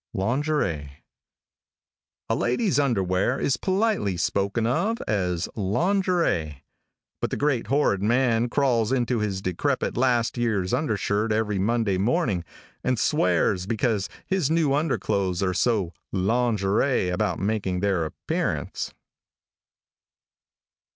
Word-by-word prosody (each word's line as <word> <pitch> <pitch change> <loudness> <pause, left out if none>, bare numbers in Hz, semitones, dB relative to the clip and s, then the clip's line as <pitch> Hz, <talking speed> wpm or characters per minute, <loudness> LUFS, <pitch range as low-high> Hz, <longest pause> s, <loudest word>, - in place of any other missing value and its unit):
LINGERIE. 100 - -1 1.3
|A - - 0
LADY'S 140 - +1
underwear 100 -3 +1
is 135 - +1
politely 190 - 0
spoken 100 +5 0
of 200 - +1
as 90 -5 0
"lingerie," 110 - 0 0.6
but - - 0
the - - -3
great 140 -7 0
horrid 135 -7 +2
man 120 +1 +2
crawls 120 -5 +1
into 125 -2 +1
his 100 -3 -2
decrepit 90 -2 -1
last 120 -1 +1
year's 105 -6 0
undershirt 110 -5 0
every 105 -2 0
Monday 105 -2 +1
morning, 105 - +1 0.4
and 125 -1 +1
swears 90 - +1
because 110 -2 0 0.2
his 190 -7 0
new 160 -4 +2
underclothes 100 - 0
are 90 -1 +1
so 95 -2 +1 0.2
"lingerie" 105 +1 +1
about 90 -1 0
making 95 -2 -1
their 95 -4 +1
appearance. 80 - -3
110 Hz, 110 wpm, -25 LUFS, 95-130 Hz, 1.3 s, horrid